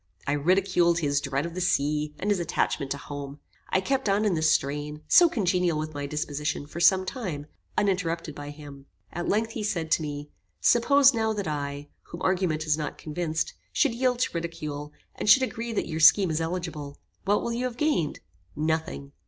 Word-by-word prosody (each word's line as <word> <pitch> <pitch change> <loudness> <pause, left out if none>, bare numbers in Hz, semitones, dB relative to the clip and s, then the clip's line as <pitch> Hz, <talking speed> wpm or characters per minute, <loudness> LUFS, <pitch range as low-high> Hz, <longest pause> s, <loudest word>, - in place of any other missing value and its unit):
I - - 0
ridiculed 175 +3 +2
his 145 -3 +1
dread 140 +2 -1
of 170 - -6
the 185 - -4
sea, 150 -2 0
and 205 - -1
his 200 - +2
attachment 150 -4 -1
to 140 - -2
home. 145 +1 -7 0.3
I - - +2
kept 260 +1 0
on 205 +2 +2
in 205 - +2
this 160 -1 +3
strain, 150 +2 -1
so 345 -1 +7
congenial 180 - +1
with 155 0 -4
my 145 -1 -4
disposition, 150 -1 -3
for 155 +3 -8
some 185 +2 +5
time, 185 - -4 0.3
uninterrupted 175 -6 0
by 145 0 -8
him. 145 -2 -11 0.3
At 175 +1 -3
length, 220 +2 +1
he 225 - -5
said 175 -7 -2
to - - +3
me, 145 -1 -5 0.3
"Suppose 275 +3 +5
now 220 -1 0
that 205 -4 -3
I, 145 -1 -4
whom 170 - -9
argument 180 -4 +1
has 155 0 +1
not 150 - -4
convinced, 165 +1 -3 0.2
should 280 -6 +2
yield 250 +1 +1
to - - 0
ridicule, 155 -3 -5 0.2
and - - -2
should 265 +4 +8
agree 235 -2 -3
that 220 - -1
your 160 -1 -3
scheme 185 +2 +6
is 160 +1 -1
eligible; 165 -4 -4 0.3
what 205 +1 +2
will 235 - -2
you 245 +2 -1
have 245 -2 -4
gained? 290 - 0 0.3
Nothing. 160 -2 -2
165 Hz, 195 wpm, -27 LUFS, 150-200 Hz, 0.3 s, should